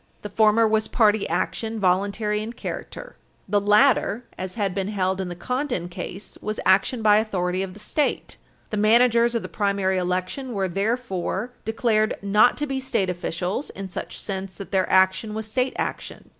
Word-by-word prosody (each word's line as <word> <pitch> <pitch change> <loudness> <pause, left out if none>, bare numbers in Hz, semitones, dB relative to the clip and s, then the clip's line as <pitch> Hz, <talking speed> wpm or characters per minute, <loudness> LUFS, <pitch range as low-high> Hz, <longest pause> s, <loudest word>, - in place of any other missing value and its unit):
The 210 - -6
former 220 +2 +4
was 220 0 +1
party 220 -3 +2
action, 225 -1 -2
voluntary 200 +3 +1
in 225 +2 -5
character. - - -7 0.3
The 205 +1 +2
latter, 215 +2 +3
as 185 0 -6
had 200 -4 -1
been 195 0 -2
held 190 -2 -1
in 185 - -4
the 175 - -6
Condon 250 -2 -2
case, 180 +3 -8
was 215 0 -3
action 200 +5 +3
by 210 -1 +6
authority 185 -4 0
of 190 -1 -4
the - - -11
State. 290 +8 -1 0.4
The 215 - -1
managers 235 +2 +4
of 230 - -1
the - - -5
primary 200 -2 0
election 185 +9 -2
were 195 -2 0
therefore 200 +2 -2
declared 220 -1 +1
not 210 +4 +4
to 295 - -1
be 270 -2 -2
state 230 -8 0
officials 180 - -3
in 195 -1 -7
such - - -6
sense 190 -2 -5
that 195 - -9
their 190 -2 +1
action 190 +3 +3
was 220 0 -4
state 255 +4 0
action. - - -5
210 Hz, 175 wpm, -24 LUFS, 190-225 Hz, 0.4 s, by